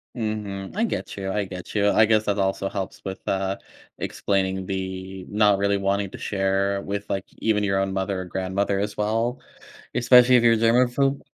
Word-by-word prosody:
Mhm, 105 Hz, -, -4 dB
I 215 Hz, -, +1 dB
get -, -, -4 dB
you; 95 Hz, -1 st, -4 dB
I 105 Hz, 0 st, 0 dB
get 90 Hz, 0 st, -9 dB
you. 105 Hz, 0 st, +3 dB
I 110 Hz, -, +5 dB
guess 110 Hz, 0 st, +2 dB
that 100 Hz, 0 st, 0 dB
also 95 Hz, 0 st, 0 dB
helps 95 Hz, -2 st, -5 dB
with, 95 Hz, 0 st, -5 dB
uh, 95 Hz, 0 st, -1 dB, 0.4 s
explaining 95 Hz, -1 st, -1 dB
the 95 Hz, 0 st, -5 dB
not 105 Hz, -1 st, +3 dB
really 100 Hz, 0 st, +2 dB
wanting 100 Hz, 0 st, 0 dB
to -, -, -8 dB
share 100 Hz, 0 st, 0 dB
with, 100 Hz, +1 st, -4 dB
like, 95 Hz, 0 st, -2 dB
even 105 Hz, -2 st, +1 dB
your 95 Hz, -1 st, +1 dB
own 95 Hz, 0 st, -1 dB
mother 95 Hz, 0 st, -2 dB
or -, -, -6 dB
grandmother 95 Hz, +2 st, -1 dB
as 105 Hz, +1 st, -3 dB
well. 115 Hz, +4 st, 0 dB, 0.5 s
Especially 125 Hz, +1 st, +6 dB
if 120 Hz, -, +5 dB
you're 115 Hz, -1 st, +6 dB
a -, -, +2 dB
germaphobe. 125 Hz, +4 st, +2 dB
100 Hz, 190 wpm, -24 LUFS, 95-110 Hz, 0.5 s, Especially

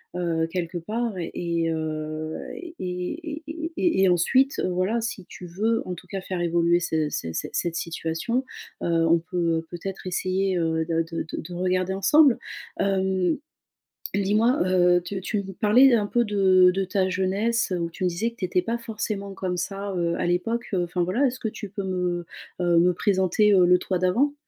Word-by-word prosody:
heu, 165 Hz, -2 st, 0 dB
quelque 175 Hz, 0 st, -3 dB
part 220 Hz, +5 st, -3 dB
et, 170 Hz, -1 st, -2 dB
heu, 155 Hz, 0 st, -3 dB, 0.2 s
et 345 Hz, -1 st, -9 dB
et 290 Hz, -, -4 dB
et 320 Hz, +1 st, -5 dB
et 335 Hz, -, +2 dB
et 190 Hz, -, +5 dB
ensuite, 260 Hz, +11 st, +3 dB
heu, -, -, 0 dB
voilà, 185 Hz, +6 st, 0 dB
si 215 Hz, -5 st, -4 dB
tu 180 Hz, -, -10 dB
veux, 220 Hz, +7 st, 0 dB
en 180 Hz, -, -3 dB
tout -, -, -13 dB
cas, 195 Hz, -2 st, -4 dB
faire 185 Hz, -1 st, -4 dB
évoluer 170 Hz, 0 st, +2 dB
ce 160 Hz, -3 st, 0 dB
cet 80 Hz, -, -4 dB
cette -, -, -4 dB
cette 170 Hz, -1 st, -1 dB
situation, 170 Hz, +10 st, -2 dB, 0.4 s
heu, 165 Hz, -1 st, +2 dB
on 170 Hz, +1 st, +5 dB
peut 170 Hz, -2 st, -1 dB
peut-être 190 Hz, +2 st, -6 dB
essayer, 185 Hz, +1 st, 0 dB
heu, 160 Hz, -1 st, 0 dB
de 165 Hz, 0 st, 0 dB
de 165 Hz, 0 st, -4 dB
de -, -, -15 dB
de -, -, -3 dB
de 175 Hz, +2 st, -9 dB
regarder 185 Hz, +1 st, 0 dB
ensemble. 270 Hz, +7 st, +5 dB, 0.4 s
Hem, 190 Hz, -3 st, +1 dB, 0.8 s
dis-moi, 215 Hz, +7 st, +2 dB
heu, 180 Hz, -1 st, +4 dB
tu 195 Hz, +1 st, -4 dB
tu 200 Hz, +1 st, -2 dB
me 195 Hz, -, -7 dB
parlais 240 Hz, +7 st, +5 dB
un 205 Hz, -2 st, +1 dB
peu 240 Hz, +2 st, +2 dB
de 190 Hz, -3 st, +5 dB
de 190 Hz, +1 st, -1 dB
ta 190 Hz, 0 st, 0 dB
jeunesse, 200 Hz, +4 st, 0 dB
heu, 175 Hz, -, -1 dB
où 170 Hz, 0 st, -2 dB
tu 180 Hz, +2 st, -4 dB
me -, -, +3 dB
disais 220 Hz, +7 st, -1 dB
que 230 Hz, -, -23 dB
tu 185 Hz, -, -2 dB
étais 180 Hz, 0 st, +1 dB
pas 230 Hz, +5 st, -2 dB
forcément 215 Hz, -3 st, -4 dB
comme 185 Hz, -2 st, -3 dB
ça, 195 Hz, +2 st, -3 dB
heu, 170 Hz, 0 st, 0 dB
à -, -, -2 dB
l'époque, 225 Hz, +7 st, -1 dB
heu, 180 Hz, -2 st, +2 dB
enfin, 175 Hz, 0 st, -1 dB
voilà. 235 Hz, +11 st, +2 dB
Est-ce 255 Hz, +1 st, -4 dB
que 220 Hz, -, -2 dB
tu 205 Hz, -2 st, -8 dB
peux 200 Hz, 0 st, -5 dB
me, 180 Hz, -2 st, -2 dB, 0.4 s
heu, 175 Hz, -1 st, +4 dB
me 180 Hz, +1 st, +4 dB
présenter, 195 Hz, +2 st, +2 dB
heu, 180 Hz, -2 st, +6 dB
le 180 Hz, 0 st, +6 dB
toi 185 Hz, -2 st, -2 dB
d'avant? 240 Hz, +11 st, +2 dB
185 Hz, 200 wpm, -25 LUFS, 175-210 Hz, 0.8 s, heu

